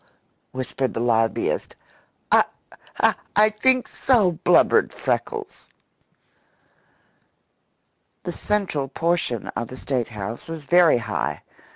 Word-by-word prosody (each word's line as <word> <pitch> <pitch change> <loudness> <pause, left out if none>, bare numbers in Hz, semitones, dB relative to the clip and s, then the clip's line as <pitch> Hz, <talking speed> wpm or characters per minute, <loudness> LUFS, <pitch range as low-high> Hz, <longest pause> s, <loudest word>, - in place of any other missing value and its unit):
whispered 130 0 -3
the - - -1
lobbyist. 115 -1 0 0.6
"I - - +6 0.9
I 215 +1 +5
think 255 +4 +2
so!" 220 -9 +2
blubbered 175 +2 +3
Freckles. 425 -2 -4 2.5
The - - -3
central 190 -10 -1
portion 165 - -1
of 120 - -4
the 130 - -10
State 125 -3 -2
house 110 +1 -7
was 165 -2 -6
very 175 -2 +5
high. 115 -5 -3
150 Hz, 95 wpm, -23 LUFS, -, 2.5 s, I